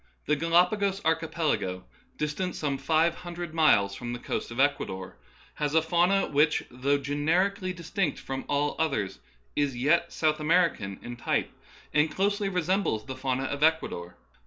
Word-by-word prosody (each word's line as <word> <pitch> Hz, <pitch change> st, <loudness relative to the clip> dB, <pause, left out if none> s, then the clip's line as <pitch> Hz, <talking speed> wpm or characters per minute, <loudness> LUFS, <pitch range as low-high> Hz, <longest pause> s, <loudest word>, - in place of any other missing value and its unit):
The 150 Hz, -, +2 dB
Galapagos 180 Hz, +5 st, +2 dB
archipelago, 160 Hz, -, 0 dB, 0.3 s
distant 150 Hz, +5 st, -2 dB
some 140 Hz, -3 st, -2 dB
five 160 Hz, +4 st, +2 dB
hun 175 Hz, -1 st, -8 dB
dred 175 Hz, -2 st, -5 dB
miles 105 Hz, -12 st, +4 dB
from 120 Hz, +4 st, -5 dB
the -, -, -3 dB
coast -, -, -4 dB
of 120 Hz, +2 st, -7 dB
Ecuador, 95 Hz, -10 st, 0 dB, 0.4 s
has 150 Hz, 0 st, -2 dB
a 160 Hz, -, +6 dB
fauna 175 Hz, +4 st, +3 dB
which, 150 Hz, +1 st, +2 dB
though 135 Hz, +3 st, +1 dB
generically 175 Hz, +8 st, 0 dB
distinct 180 Hz, +2 st, -2 dB
from 135 Hz, 0 st, -5 dB
all 145 Hz, +1 st, +1 dB
others, 125 Hz, -12 st, -1 dB, 0.4 s
is 140 Hz, -4 st, 0 dB
yet 170 Hz, +7 st, +2 dB
South 155 Hz, -1 st, +1 dB
American 155 Hz, -, +1 dB
in 120 Hz, 0 st, -7 dB
type, -, -, -1 dB, 0.4 s
and 150 Hz, +1 st, +3 dB
closely 200 Hz, +2 st, 0 dB
resem 185 Hz, +1 st, +1 dB
bles 110 Hz, -, -2 dB
the 130 Hz, -, -6 dB
fauna 130 Hz, 0 st, -1 dB
of 140 Hz, +2 st, -3 dB
Ecuador. 150 Hz, -, +1 dB
150 Hz, 160 wpm, -28 LUFS, 135-170 Hz, 0.4 s, a